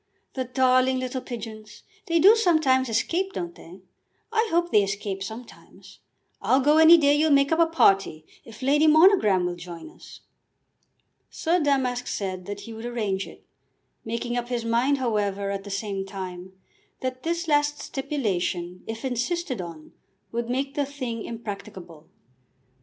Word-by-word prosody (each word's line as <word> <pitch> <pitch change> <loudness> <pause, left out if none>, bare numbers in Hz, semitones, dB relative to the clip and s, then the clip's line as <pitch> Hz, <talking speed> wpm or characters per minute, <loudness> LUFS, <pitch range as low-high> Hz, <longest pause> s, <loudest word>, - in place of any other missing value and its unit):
"The 260 -1 -3
darling 255 +1 +2
little 255 0 -3
pigeons! 220 -3 -9 0.2
They 335 -1 +2
do 395 +7 +7
sometimes 310 - +2
escape, 345 - -1
don't 175 -1 -4
they? 180 +3 -14 0.5
I 450 0 +1
hope 345 +1 +1
they 210 - +5
escape 195 0 -3
sometimes. 220 +5 -10 0.4
I'll 260 - +3
go 295 +3 +4
any 320 +2 +9
day 285 -3 +4
you'll 305 +2 +3
make 280 0 +4
up 320 - +2
a 335 - +5
party, 195 - +2 0.2
if 225 +2 -12
Lady 295 +4 +4
Monogram 310 - +5
will 180 - -1
join 175 - -10
us." - - -15 1.1
Sir 345 +2 0
Damask 265 -5 0
said 185 -2 -4
that 205 0 -6
he 225 +3 -9
would 225 +2 -7
arrange 210 -5 -2
it, - - -15 0.6
making 235 +2 -3
up 240 0 -3
his 240 -2 -2
mind, 240 +5 +2
however, 205 -5 -1
at 195 0 -5
the - - -8
same 195 -1 -3
time, 190 -1 -8 0.5
that 255 0 -4
this 335 +2 -2
last 295 -1 +2
stipulation, 190 -10 -3
if 225 +3 -6
insisted 255 - -2
on, 165 -3 -10 0.4
would 235 0 -3
make 270 +2 -2
the 290 - 0
thing 255 -5 -5
impracticable. 200 -8 -8
240 Hz, 155 wpm, -25 LUFS, 200-290 Hz, 1.1 s, any